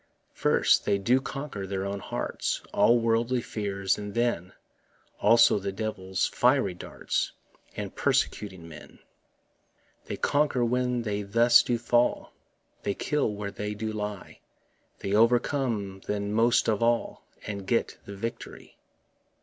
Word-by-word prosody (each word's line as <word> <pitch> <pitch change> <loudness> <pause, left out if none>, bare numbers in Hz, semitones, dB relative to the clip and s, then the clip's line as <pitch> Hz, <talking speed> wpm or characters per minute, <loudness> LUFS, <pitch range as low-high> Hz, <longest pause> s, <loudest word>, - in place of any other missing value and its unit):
First, - - +3
they 100 - +2
do 120 +7 +2
conquer 135 -8 -6
their 95 0 -3
own 100 0 -3
hearts, - - -3
All 115 +4 +5
worldly 115 +2 +1
fears, 100 -4 -2
and 105 0 -7
then 115 -7 0 0.7
Also 115 -2 +5
the 100 0 -3
devil's 95 -2 -2
fiery 95 - +2
darts, 90 - -3 0.4
And - - -5
persecuting 95 -5 -1
men. 80 -2 -12 1.1
They - - -5
conquer 145 -4 +1
when 125 0 0
they 105 -2 -2
thus 115 +4 +5
do 120 - -1
fall, 120 +1 +1 0.5
They 100 - -2
kill 145 -7 0
when 100 -1 -5
they 105 +1 -4
do 110 +1 -4
die; 105 -2 -6 0.6
They 100 - -2
overcome 115 -3 +1
then 100 0 -2
most 115 +2 +3
of 110 -1 +1
all, 120 0 0 0.2
And 100 -2 -6
get 115 +2 0
the 100 - -8
victory. 115 +4 -7
105 Hz, 135 wpm, -27 LUFS, 100-120 Hz, 1.1 s, All